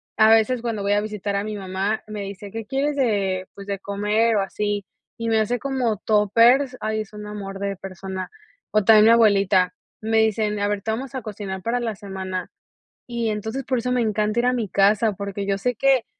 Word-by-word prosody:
A 220 Hz, 0 st, +6 dB
veces, 225 Hz, +2 st, +4 dB
cuando 225 Hz, -4 st, -3 dB
voy 200 Hz, -, 0 dB
a 205 Hz, -, +2 dB
visitar 210 Hz, -1 st, -3 dB
a 200 Hz, -, 0 dB
mi 215 Hz, 0 st, -4 dB
mamá 195 Hz, +2 st, -2 dB
me 215 Hz, -1 st, -6 dB
dice: 200 Hz, +1 st, -7 dB
"¿Qué 225 Hz, 0 st, -6 dB
quieres 280 Hz, +2 st, 0 dB
de, 200 Hz, -8 st, 0 dB
pues, 200 Hz, -, -9 dB
de 200 Hz, -1 st, -3 dB
comer 210 Hz, +3 st, +1 dB
o 205 Hz, -, +3 dB
así?". 205 Hz, 0 st, -2 dB, 0.3 s
Y 230 Hz, -, -3 dB
me 225 Hz, -1 st, +3 dB
hace 220 Hz, +3 st, 0 dB
como 250 Hz, -4 st, -1 dB
toppers. 230 Hz, +6 st, +3 dB
Ay, 215 Hz, 0 st, -1 dB
es 215 Hz, -1 st, -10 dB
un 210 Hz, 0 st, -8 dB
amor 200 Hz, -2 st, -6 dB
de 200 Hz, 0 st, -3 dB
persona. 190 Hz, 0 st, -6 dB, 0.4 s
O 215 Hz, -1 st, +3 dB
también 215 Hz, +1 st, +7 dB
mi 225 Hz, -, +7 dB
abuelita. 200 Hz, -5 st, +4 dB, 0.3 s
Me 220 Hz, 0 st, 0 dB
dicen: 215 Hz, -1 st, +1 dB
"A 205 Hz, -, +1 dB
ver, 205 Hz, -1 st, -1 dB
te 220 Hz, -, -2 dB
vamos 255 Hz, +4 st, -4 dB
a 260 Hz, -, -3 dB
cocinar 200 Hz, -3 st, -6 dB
para 240 Hz, +2 st, 0 dB
la 230 Hz, -3 st, -3 dB
semana", 190 Hz, -3 st, -5 dB, 0.5 s
y 235 Hz, -2 st, -2 dB
entonces 220 Hz, +5 st, -3 dB
por 255 Hz, -2 st, 0 dB
eso 250 Hz, +2 st, -2 dB
me 250 Hz, -1 st, +2 dB
encanta 215 Hz, 0 st, 0 dB
ir 240 Hz, -, +1 dB
a 250 Hz, -, +3 dB
mi 230 Hz, -5 st, -2 dB
casa, 205 Hz, +4 st, +3 dB
porque 200 Hz, 0 st, -5 dB
yo 195 Hz, 0 st, 0 dB
sé 245 Hz, +5 st, -1 dB
que 265 Hz, 0 st, +3 dB
210 Hz, 220 wpm, -23 LUFS, 200-230 Hz, 0.5 s, también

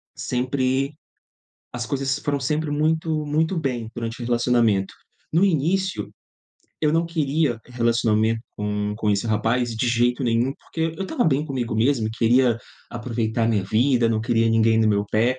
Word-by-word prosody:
Sempre 130 Hz, +2 st, -1 dB, 0.8 s
as 120 Hz, -1 st, -4 dB
coisas 135 Hz, +2 st, -1 dB
foram 145 Hz, -1 st, -1 dB
sempre 150 Hz, +3 st, -1 dB
muito 155 Hz, +1 st, 0 dB
muito 160 Hz, +5 st, 0 dB
bem 125 Hz, -7 st, -2 dB
durante 115 Hz, 0 st, -5 dB
o -, -, -4 dB
relacionamento. 120 Hz, -5 st, +2 dB, 0.4 s
No 170 Hz, +5 st, +4 dB
início, 190 Hz, +3 st, 0 dB, 0.7 s
eu 150 Hz, -1 st, +2 dB
não 165 Hz, +1 st, +2 dB
queria 150 Hz, -6 st, 0 dB
relacionamento 115 Hz, -2 st, +1 dB, 0.2 s
com 105 Hz, 0 st, -2 dB
com 110 Hz, -1 st, -2 dB
esse 100 Hz, +3 st, 0 dB
rapaz 115 Hz, +3 st, +1 dB
de 120 Hz, +3 st, 0 dB
jeito 120 Hz, +2 st, +1 dB
nenhum, 120 Hz, +3 st, +1 dB
porque 165 Hz, 0 st, -3 dB
eu 195 Hz, -, -2 dB
estava 245 Hz, +6 st, -1 dB
bem 145 Hz, -1 st, +2 dB
comigo 130 Hz, -7 st, -3 dB
mesmo, 115 Hz, -1 st, +2 dB
e -, -, -5 dB
queria 120 Hz, +1 st, +3 dB, 0.3 s
aproveitar 115 Hz, -1 st, -2 dB
a -, -, +2 dB
minha 105 Hz, -4 st, +1 dB
vida, 120 Hz, +3 st, +2 dB
não 110 Hz, -1 st, 0 dB
queria 115 Hz, 0 st, +2 dB
ninguém 110 Hz, 0 st, +3 dB
no 110 Hz, -, +3 dB
meu 100 Hz, -1 st, +1 dB
pé. 120 Hz, +4 st, +2 dB
120 Hz, 165 wpm, -23 LUFS, 115-145 Hz, 0.8 s, No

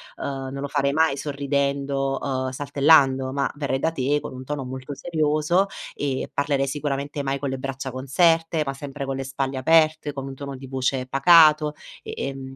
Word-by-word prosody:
uhm, 135 Hz, -1 st, -5 dB
non 140 Hz, 0 st, -5 dB
lo 140 Hz, -, -3 dB
farei 140 Hz, 0 st, 0 dB
mai 160 Hz, -2 st, +3 dB
sorridendo, 140 Hz, -1 st, -1 dB
uhm, 130 Hz, -1 st, -2 dB
saltellando, 140 Hz, -1 st, +3 dB
ma 140 Hz, 0 st, 0 dB
verrei 140 Hz, -2 st, -1 dB
da 160 Hz, +4 st, 0 dB
te 145 Hz, -1 st, 0 dB
con -, -, -8 dB
un 130 Hz, -, -8 dB
tono 140 Hz, 0 st, -4 dB
molto 130 Hz, +2 st, -7 dB
serioso, 155 Hz, +4 st, +1 dB, 0.3 s
e 140 Hz, -2 st, -2 dB
parlerei 140 Hz, -1 st, +1 dB
sicuramente 145 Hz, 0 st, -3 dB
mai 135 Hz, 0 st, -1 dB
con 140 Hz, -1 st, -3 dB
le 130 Hz, -, -4 dB
braccia 135 Hz, 0 st, -5 dB
conserte, 165 Hz, +5 st, +2 dB
ma 135 Hz, -, -2 dB
sempre 140 Hz, 0 st, -6 dB
con 135 Hz, 0 st, -3 dB
le 135 Hz, -, -3 dB
spalle 135 Hz, 0 st, -3 dB
aperte, 155 Hz, +1 st, +3 dB
con 135 Hz, -1 st, -6 dB
un 135 Hz, -, -6 dB
tono 140 Hz, 0 st, -7 dB
di 135 Hz, -, -10 dB
voce 130 Hz, 0 st, -1 dB
pacato 155 Hz, +3 st, +6 dB, 0.4 s
e, -, -, -7 dB
ehm, 135 Hz, -1 st, -5 dB
140 Hz, 185 wpm, -24 LUFS, 135-145 Hz, 0.4 s, pacato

